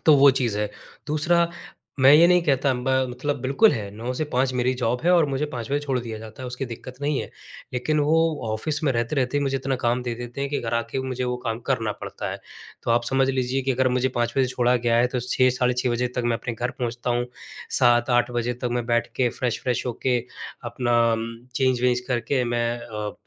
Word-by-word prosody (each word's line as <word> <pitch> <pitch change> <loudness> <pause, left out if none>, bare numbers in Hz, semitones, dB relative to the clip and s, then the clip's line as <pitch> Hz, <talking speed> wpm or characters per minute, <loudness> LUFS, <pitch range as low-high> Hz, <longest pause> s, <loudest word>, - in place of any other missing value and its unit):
तो 155 - +8
वो 140 0 +8
चीज़ 120 -6 -1
है। 105 -1 -1 0.4
दूसरा 170 +3 +2 0.5
मैं 135 +2 +8
ये 165 +3 +8
नहीं 180 -1 +5
कहता 135 -3 +2
ब 125 +1 -3 0.2
मतलब 145 +2 -3
बिल्कुल 135 - +4
है, 105 -7 -4
9 115 +5 -5
से 155 - -1
5 130 +1 +2
मेरी 125 +1 +1
जॉब 125 0 -1
है 175 - +4
और 165 -3 +4
मुझे 140 +2 -1
5 120 -1 -5
बजे 145 - +2
छोड़ 135 -3 -1
दिया 115 -2 -6
जाता 110 +3 -10
है - - -5
उसकी 125 +2 -4
दिक्कत 120 +2 -8
नहीं 145 -1 0
है, - - -7 0.4
लेकिन 150 +5 0
वो 150 +2 +3 0.4
ऑफ़िस 150 +7 -2
में 135 - +3
रहते-रहते 125 +3 0
ही 145 - 0
मुझे 135 -1 0
इतना 135 0 -1
काम 120 +1 +1
दे 120 -1 -3
देते 120 +3 -7
हैं 140 - -2
कि 145 - -1
घर 115 0 -2
आ 115 - +2
के 135 - -1
मुझे 130 0 -2
वो 125 0 -1
काम 115 0 -2
करना 115 -5 +1
पड़ता - - -5
है। - - -6 0.4
तो - - -2
आप 120 0 +3
समझ 135 +1 +2
लीजिए 130 0 -1
कि 135 0 +1
अगर 130 +1 +2
मुझे 125 +1 +1
5 120 0 +1
बजे 130 - +4
छोड़ा 125 0 +2
गया 120 -1 +1
है 120 +1 +4
तो 125 - +1
6:00-6:30 125 0 +1
बजे 125 +1 0
तक 125 - 0
मैं 115 -1 +1
अपने 115 -1 -4
घर 120 +2 -2
पहुँचता 120 0 -2
हूँ 120 0 0 0.5
7:00-8:00 120 -1 +3
बजे 120 0 -1
तक 125 - +1
मैं 120 -1 -1
बैठ 120 -1 +1
के 125 -2 +3
फ्रेश-व्रेश 125 0 -1
होके 125 +1 0 0.5
अपना 120 0 +1
अम 115 0 -1 0.3
चेंज-वेंज 125 -2 +2
करके 125 +1 0
मैं 120 0 0
अ, 105 -3 -5
125 Hz, 225 wpm, -24 LUFS, 120-135 Hz, 0.5 s, तो